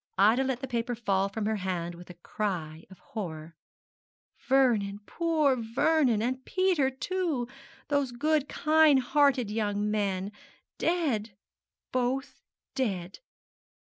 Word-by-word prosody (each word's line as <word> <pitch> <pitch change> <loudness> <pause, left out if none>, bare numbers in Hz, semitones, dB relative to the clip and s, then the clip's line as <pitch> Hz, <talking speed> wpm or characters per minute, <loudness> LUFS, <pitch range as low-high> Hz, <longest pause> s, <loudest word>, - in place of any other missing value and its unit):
Ida 220 +7 +5
let 260 -1 -2
the 265 - -4
paper 240 0 -2
fall 200 -4 0
from 205 +1 -3
her 220 0 0
hand 180 -3 -3
with 175 +1 -12
a 180 - -10
cry 170 -4 -4
of 190 - -14
horror. 165 -5 -7 0.8
'Vernon, 235 -7 +2
poor 315 -4 +1
Vernon, 245 0 +2
and 260 +2 -2
Peter 370 -7 +2
too 300 -2 -2 0.4
those 285 -3 0
good, 295 +3 0
kind 310 -2 +4
hearted 260 -4 +2
young 210 -1 -1
men 200 -2 -1 0.5
dead 240 - 0 0.5
both 260 +2 -1 0.3
dead!' 190 -8 -2
240 Hz, 120 wpm, -29 LUFS, 200-275 Hz, 0.8 s, Ida